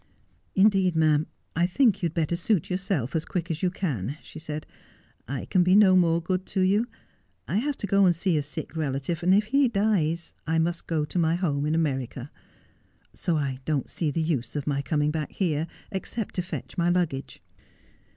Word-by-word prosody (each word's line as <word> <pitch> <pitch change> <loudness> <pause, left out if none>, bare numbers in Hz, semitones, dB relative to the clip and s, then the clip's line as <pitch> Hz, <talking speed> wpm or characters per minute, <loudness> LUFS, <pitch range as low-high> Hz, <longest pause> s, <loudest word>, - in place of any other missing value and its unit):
'Indeed, 190 -3 +4
ma'am, 155 -1 +3 0.3
I 175 +1 +3
think 210 +1 +3
you'd 170 -3 -1
better 165 0 +1
suit 180 0 0
yourself, 180 - -1
as 160 - +1
quick 175 0 -3
as 160 - -3
you 185 - +2
can,' 145 - -3
she 155 - -10
said. 155 -1 -6 0.3
' - - -35
I - - -5
can 185 - +2
be 180 +2 +4
no 200 -3 +7
more 170 -2 +4
good 185 +1 -2
to 190 - -1
you. 200 +5 +3 0.6
I 170 +10 0
have 280 +5 -1
to - - -4
go 195 0 +4
to - - +6
see 175 +1 0
a 150 - +2
sick 145 +3 -7
relative, 150 +2 -2
and 180 +2 +3
if 205 +2 +5
he 275 +4 +3
dies 195 -7 0
I 160 0 +1
must 170 +1 0
go 155 -3 0
to 175 - -2
my 165 0 +3
home 150 -5 0
in 155 - +1
America. 135 -4 -2 0.8
So 170 -3 0
I 135 -3 -2
don't 150 -5 -1
see 160 - -1
the 160 +2 -1
use 155 -6 -2
of 145 -2 -2
my 140 -2 0
coming 150 0 0
back 155 -2 -3
here, 160 -4 0 0.2
except 205 +2 -4
to 180 - 0
fetch 180 +1 -6
my 170 0 +3
luggage.' 170 -6 -1
170 Hz, 200 wpm, -26 LUFS, 150-190 Hz, 0.8 s, no